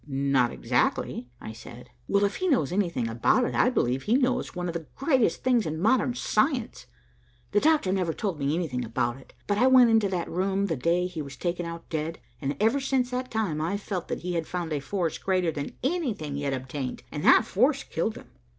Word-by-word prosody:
"Not 135 -3 +1
exactly," 125 - -1
I 110 - -8
said. 120 +2 -12 0.2
"Well 200 0 +2
if 200 - -2
he 370 - -1
knows 255 - +2
anything 175 - 0
about 115 - +2
it, - - -3
I - - +4
believe 130 - 0
he 220 - +1
knows 255 -4 0
one 180 0 -3
of 170 - -3
the 165 -2 -5
greatest 265 - +1
things 245 -6 +2
in 155 +1 -3
modern 240 +5 +2
science. 245 +1 0 0.6
The 205 - +4
Doctor 300 -9 +3
never 180 -4 0
told 185 -2 -3
me 140 +2 0
anything 145 -8 -2
about 120 +1 -1
it, 135 - -17
but 205 0 0
I 255 - +5
went 255 -3 +7
into 220 -3 +3
that 180 -3 -2
room 195 +3 0
the 170 -5 -1
day 170 +7 +1
he 175 -3 -4
was 140 -2 -8
taken 175 +1 -2
out 170 0 -8
dead, 160 +1 -2 0.2
and 140 0 -2
ever 225 +7 +3
since 260 -2 0
that 255 0 -3
time 200 -9 -1
I've 175 +6 -1
felt 185 -4 -4
that - - -4
he 180 0 -3
had 165 -2 -2
found 175 -3 -3
a 145 - 0
force 165 +3 -2
greater 185 -3 +1
than 145 -2 -6
anything 250 - -1
yet 140 -1 -2
obtained, 130 0 -5
and - - -5
that - - +7
that - - -13
force - - +2
killed - - -2
him." - - -13
175 Hz, 220 wpm, -27 LUFS, 145-225 Hz, 0.6 s, went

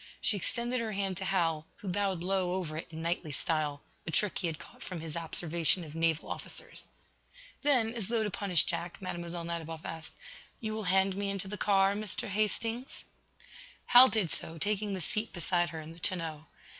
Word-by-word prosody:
She 210 - +3
extended 240 +5 0
her 225 -2 -2
hand 195 -1 0
to 190 - -3
Hal, 165 -5 +1
who 205 - -10
bowed 190 -2 0
low 185 -1 +1
over 170 -5 -3
it 160 - -4
in 160 0 -6
knightly 170 -2 -1
style 150 0 -1 0.2
a - - 0
trick 195 +5 +2
he 180 - 0
had 160 -2 -3
caught - - -13
from 180 -3 -5
his 160 -1 -5
observation 170 +1 +1
of 155 -2 -9
naval 165 -1 +1
officers. - - -6 0.7
Then, 250 -6 +5
as 225 -6 -3
though 230 -1 +1
to 210 - -1
punish 185 -3 +3
Jack, 175 0 -3
Mlle. 175 -2 -4
Nadiboff 165 -1 -4
asked: 160 0 -6 0.5
"You 220 -2 -3
will 215 -1 -3
hand 190 +1 +3
me 200 0 -1
into 195 0 -2
the 205 - -4
car, 195 -1 +4
Mr. 210 -1 -2
Hastings?" 225 +4 -1 0.8
Hal 250 +2 +9
did 200 -8 +1
so, 165 - -5
taking 205 +2 0
the 185 - -4
seat 215 +7 +1
beside 175 0 +1
her 160 - -6
in 155 +1 -9
the 165 - -15
tonneau. 165 -4 -2
185 Hz, 195 wpm, -32 LUFS, 165-205 Hz, 0.8 s, Hal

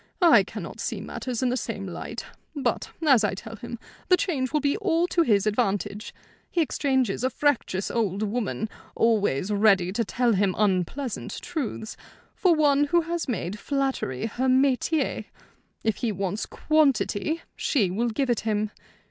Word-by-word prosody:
I 340 - +8
cannot - - -8
see - - -3
matters 255 -1 -4
in 255 - +2
the 250 - 0
same 225 -5 -4
light. 180 - -6 0.3
But, 285 - -1 0.2
as 260 -6 +6
I 205 - +1
tell 225 +3 -8
him, 235 +2 -7 0.3
the 365 - +6
change 270 -10 -1
will 300 - +2
be 285 0 +1
all 350 -5 +2
to 345 - +2
his 210 - +3
advantage. 210 -1 -1 0.4
He 350 - -1
exchanges 265 -8 +1
a 260 - +3
fractious 255 -9 0
old 210 -3 0
woman, 215 - -2 0.3
always 210 -6 +2
ready 200 -3 +4
to 230 +4 0
tell 240 +2 +1
him 195 -2 +1
unpleasant 210 +6 -1
truths, 245 - -4 0.4
for 360 -4 +3
one 290 -2 +4
who 345 +4 +3
has 335 0 -3
made 210 -5 -3
flattery 270 - -1
her 245 +4 -1
métier. 265 +3 +2 0.6
If 220 -1 +1
he 235 - -1
wants 195 +1 -3
quantity 310 -1 +1
she 210 - +1
will 235 +6 0
give 255 +3 0
it 235 - +1
him. 215 -1 -1
240 Hz, 160 wpm, -26 LUFS, 205-285 Hz, 0.6 s, I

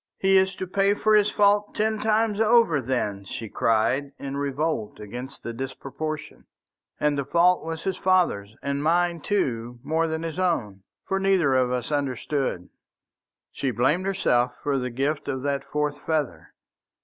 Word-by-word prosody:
"He 195 0 +3
is 190 0 +2
to 185 - -4
pay 195 +2 +2
for 215 +1 +2
his 210 -1 +5
fault 205 0 +2
ten 220 0 0
times 220 -1 +1
over, 220 - +4
then," 110 -6 -2
she 110 +3 -6
cried, 125 +7 +1
in 140 0 -5
revolt 140 -4 -2
against 125 +6 -8
the 115 - -4
disproportion. 135 +5 -6 0.5
"And 150 -1 +1
the - - 0
fault 170 +6 +3
was 160 0 -5
his 190 - -2
father's 170 - +1
and 140 0 -1
mine 170 +1 +1
too 125 - -1
more 160 +1 +1
than 160 0 -3
his 165 +2 -4
own. 115 - -1 0.2
For 195 - -1
neither 190 -8 +3
of 130 -1 +2
us 125 +2 -2
understood." 135 -7 -2 0.8
She 135 - -2
blamed 150 +10 +1
herself 125 -10 +1
for 140 -2 +1
the 125 0 -2
gift 140 +5 -2
of 130 -2 -3
that 140 -1 -1
fourth 150 0 -2
feather. 155 -5 -3
150 Hz, 160 wpm, -25 LUFS, 130-185 Hz, 0.8 s, his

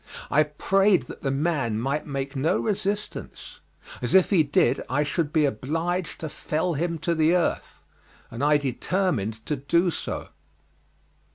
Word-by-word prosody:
I 150 - +5
prayed 190 - +2
that - - -11
the 135 - -1
man 135 -6 0
might 140 +6 -2
make 140 0 -4
no 140 +4 +1
resistance, 210 -1 -3 0.4
as - - 0
if 190 +1 +5
he 185 -5 +5
did 140 -3 +2
I 145 +4 +2
should 150 0 -1
be 155 -2 +3
obliged 165 - -2
to 160 - -4
fell 160 +4 -2
him 170 +3 -1
to 170 - +2
the 160 +1 +3
earth, 175 - -1 0.5
and 115 +4 -4
I 150 0 +5
determined 130 - -1
to 150 - -1
do 170 +6 +2
so. - - -5
155 Hz, 155 wpm, -25 LUFS, 135-175 Hz, 0.5 s, I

